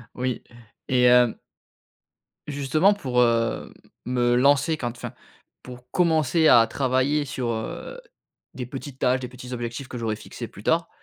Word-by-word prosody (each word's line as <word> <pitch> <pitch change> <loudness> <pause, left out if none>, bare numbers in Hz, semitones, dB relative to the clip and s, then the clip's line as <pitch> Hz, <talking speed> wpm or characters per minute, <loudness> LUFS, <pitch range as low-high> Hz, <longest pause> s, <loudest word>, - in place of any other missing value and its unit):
Oui. 125 0 -3 0.4
Et 125 -1 +2
hem 125 -1 +5 1.1
justement 150 +7 +2
pour, 125 -10 0
heu, 115 -1 +1 0.3
me 120 -1 +1
lancer 140 +4 +3
quand 120 -5 -3
enfin, - - -7 0.5
pour 125 0 -12
commencer 160 -2 +3
à 115 -1 +7
travailler 135 +4 +1
sur, 130 -3 -4
heu, 110 - -5 0.6
des 125 - -5
petites 135 +1 -8
tâches, 130 +1 +2
des 125 - -5
petits 125 0 -9
objectifs 120 +2 -5
que 125 - -7
j'aurais 110 -2 -2
fixés - - -8
plus - - -13
tard, - - +1
125 Hz, 145 wpm, -24 LUFS, 120-140 Hz, 1.1 s, à